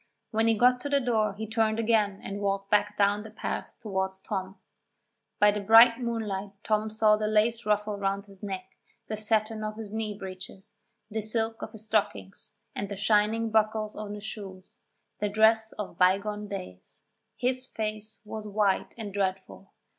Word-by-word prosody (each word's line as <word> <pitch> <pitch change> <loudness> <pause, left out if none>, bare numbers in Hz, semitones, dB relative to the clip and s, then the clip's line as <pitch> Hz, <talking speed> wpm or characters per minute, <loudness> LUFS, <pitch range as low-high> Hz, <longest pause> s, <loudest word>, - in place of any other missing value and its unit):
When 225 +1 +2
he 225 -1 +3
got 250 +2 +4
to 285 - -4
the 285 0 +3
door 220 -5 +1
he 220 +2 -4
turned 220 0 +1
again 215 -3 +1
and 200 +1 -5
walked 195 0 -1
back 205 0 +2
down 205 0 +3
the 220 - -9
path 215 - -5
towards 190 -3 -2
Tom. 190 0 -5 0.8
By 210 0 +6
the 205 0 -3
bright 230 +3 +7
moonlight 210 -5 -3
Tom 215 0 +1
saw 215 0 +4
the 215 0 -1
lace 220 +1 +2
ruffle 210 0 +1
round 200 0 -1
his 195 -2 -17
neck, 190 -3 -4 0.4
the 215 - -1
satin 215 0 0
of 215 0 -3
his 215 -2 -7
knee 215 -2 -3
breeches, 190 0 -9 0.4
the 220 +1 -1
silk 225 +1 -2
of - - -6
his 220 -1 -3
stockings, 105 - -2 0.2
and 200 - -4
the 200 - -5
shining 215 +2 +2
buckles 215 0 +1
on 210 -1 -5
his 205 - -9
shoes 195 -4 -8 0.4
the 210 - 0
dress 220 +1 +4
of 200 -5 -7
bygone 205 +3 +2
days. 90 - -9 0.3
His 255 +1 -1
face 215 -1 -5
was 215 0 -6
white 205 -1 +1
and 210 -4 -6
dreadful. 195 -1 -3
210 Hz, 175 wpm, -28 LUFS, 200-220 Hz, 0.8 s, bright